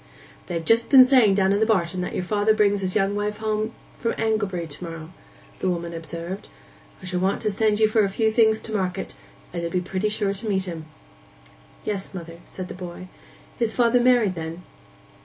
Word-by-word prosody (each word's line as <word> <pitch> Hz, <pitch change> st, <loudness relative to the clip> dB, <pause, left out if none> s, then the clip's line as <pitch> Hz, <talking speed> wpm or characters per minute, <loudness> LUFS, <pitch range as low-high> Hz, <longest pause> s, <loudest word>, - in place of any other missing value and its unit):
'They've 165 Hz, -2 st, -3 dB
just 230 Hz, +1 st, +3 dB
been 260 Hz, -2 st, +9 dB
saying 250 Hz, -7 st, +5 dB
down 195 Hz, 0 st, +3 dB
in 205 Hz, +2 st, +2 dB
barton 185 Hz, -5 st, +1 dB
that 180 Hz, -, -4 dB
your -, -, -1 dB
father 210 Hz, +3 st, +2 dB
brings 205 Hz, -1 st, +2 dB
his 185 Hz, -1 st, -1 dB
young 200 Hz, -1 st, +2 dB
wife 210 Hz, 0 st, -2 dB
home 215 Hz, 0 st, -1 dB, 0.3 s
from 230 Hz, -, 0 dB
Anglebury 205 Hz, -6 st, -1 dB
to 150 Hz, +2 st, -8 dB
morrow,' 165 Hz, 0 st, -8 dB, 0.5 s
the 185 Hz, -, 0 dB
woman 170 Hz, -1 st, -3 dB
observed. 170 Hz, +3 st, -6 dB, 0.6 s
'I -, -, -7 dB
shall 180 Hz, 0 st, -2 dB
want 190 Hz, +2 st, +1 dB
to 215 Hz, -, +1 dB
send 210 Hz, +1 st, +1 dB
you 215 Hz, -, +5 dB
for 215 Hz, 0 st, +3 dB
a 200 Hz, -, +1 dB
few 220 Hz, +3 st, +1 dB
things 220 Hz, -1 st, +4 dB
to 220 Hz, -, -6 dB
market, 185 Hz, -4 st, -2 dB, 0.4 s
and 170 Hz, -, -3 dB
you'll 170 Hz, -, -2 dB
be 180 Hz, -, 0 dB
pretty 185 Hz, +3 st, -2 dB
sure 210 Hz, -2 st, 0 dB
to 210 Hz, +3 st, -5 dB
meet 190 Hz, -2 st, 0 dB
'em.' 160 Hz, -3 st, -6 dB, 1.0 s
'Yes, 195 Hz, -2 st, -4 dB
mother,' 170 Hz, -1 st, -8 dB
said 185 Hz, -1 st, -7 dB
the -, -, -7 dB
boy. 180 Hz, 0 st, -8 dB, 0.5 s
'Is 230 Hz, -2 st, 0 dB
father 245 Hz, 0 st, +4 dB
married 240 Hz, -5 st, +4 dB
then? 165 Hz, +1 st, -6 dB
195 Hz, 200 wpm, -24 LUFS, 180-220 Hz, 1.0 s, been